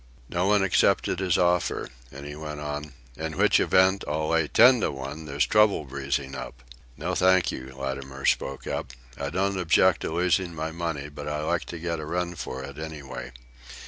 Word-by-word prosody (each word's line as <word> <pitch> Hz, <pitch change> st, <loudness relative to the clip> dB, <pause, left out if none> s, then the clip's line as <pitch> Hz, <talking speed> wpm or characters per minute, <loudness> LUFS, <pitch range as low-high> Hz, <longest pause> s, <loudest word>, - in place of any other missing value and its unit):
No 90 Hz, +2 st, 0 dB
one 105 Hz, -1 st, +4 dB
accepted 95 Hz, -1 st, +2 dB
his 95 Hz, -3 st, +2 dB
offer, 90 Hz, -1 st, +1 dB, 0.2 s
and 70 Hz, +1 st, -9 dB
he 75 Hz, 0 st, -7 dB
went 75 Hz, -1 st, -6 dB
on: 75 Hz, 0 st, -5 dB, 0.2 s
"In 80 Hz, -1 st, -4 dB
which -, -, +4 dB
event, 95 Hz, +1 st, +4 dB
I'll 75 Hz, +1 st, -1 dB
lay 80 Hz, -2 st, +2 dB
ten 125 Hz, -, +6 dB
to -, -, +1 dB
one 70 Hz, +3 st, -6 dB
there's 70 Hz, -2 st, +1 dB
trouble 105 Hz, -7 st, +3 dB
breezing 70 Hz, 0 st, -3 dB
up." 60 Hz, -2 st, -8 dB, 0.3 s
"No, -, -, -2 dB
thank 95 Hz, 0 st, +4 dB
you," 65 Hz, 0 st, -8 dB
Latimer 65 Hz, 0 st, -5 dB
spoke 70 Hz, 0 st, 0 dB
up. -, -, -4 dB, 0.2 s
"I 70 Hz, 0 st, -4 dB
don't 95 Hz, +3 st, 0 dB
object 85 Hz, -3 st, +4 dB
to -, -, -3 dB
losing 90 Hz, +1 st, +1 dB
my 80 Hz, +1 st, -3 dB
money, 80 Hz, -4 st, -3 dB
but 75 Hz, 0 st, -8 dB
I 75 Hz, 0 st, -2 dB
like 85 Hz, +2 st, 0 dB
to 85 Hz, -, -7 dB
get 85 Hz, 0 st, -3 dB
a 75 Hz, -, -5 dB
run 90 Hz, +1 st, -2 dB
for 65 Hz, -5 st, -6 dB
it 70 Hz, +2 st, -9 dB
anyway. 75 Hz, -5 st, -7 dB
80 Hz, 190 wpm, -26 LUFS, 70-90 Hz, 0.3 s, ten